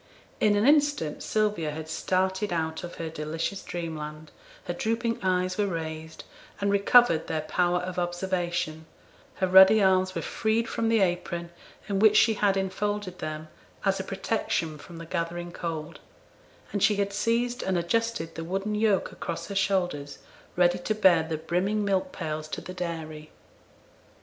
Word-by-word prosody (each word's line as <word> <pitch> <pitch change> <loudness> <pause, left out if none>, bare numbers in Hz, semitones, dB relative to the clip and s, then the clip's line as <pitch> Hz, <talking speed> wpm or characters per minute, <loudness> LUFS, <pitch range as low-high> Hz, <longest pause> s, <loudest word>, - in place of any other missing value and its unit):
In 210 -1 +4
an 205 +2 +2
instant 290 - +3
Sylvia 210 -7 0
had 155 +1 -6
started 190 +4 0
out 160 0 -2
of 175 - -7
her 165 - -4
delicious 160 +4 -3
dreamland, 155 -2 -6 0.3
her - - -3
drooping 230 +1 -1
eyes 185 0 0
were 205 - +2
raised, 160 -2 -5 0.4
and 200 0 +1
recovered 200 -4 +5
their 160 -1 -1
power 175 +3 +1
of 180 0 -4
observation; 175 -3 -2 0.5
her 185 - +1
ruddy 190 +3 +8
arms 185 -1 +3
were - - -2
freed 225 +1 0
from 225 -1 -1
the 225 -2 +3
apron 175 -2 -1 0.4
in 200 -2 0
which 215 0 +6
she 225 - +5
had 200 -2 +2
enfolded 190 0 -2
them, 155 0 -5 0.4
as 195 -1 +2
a - - -2
protection 190 -5 -2
from 170 +3 -11
the 165 - -8
gathering 175 +1 -3
cold, 165 -2 -5 0.7
and 205 - -1
she 210 - +4
had 200 0 -1
seized 235 +4 0
and 190 -1 0
adjusted 175 -1 -1
the 165 - -5
wooden 195 +5 -2
yoke 210 -2 +1
across 170 - -5
her 200 - -5
shoulders, 180 -8 0 0.4
ready 180 0 +3
to 215 +5 -1
bear 190 -6 +5
the 160 0 -3
brimming 185 +6 0
milk 190 -2 0
pails 155 0 -4
to - - -5
the 185 - -8
dairy. 160 -4 -5
185 Hz, 160 wpm, -27 LUFS, 165-205 Hz, 0.7 s, ruddy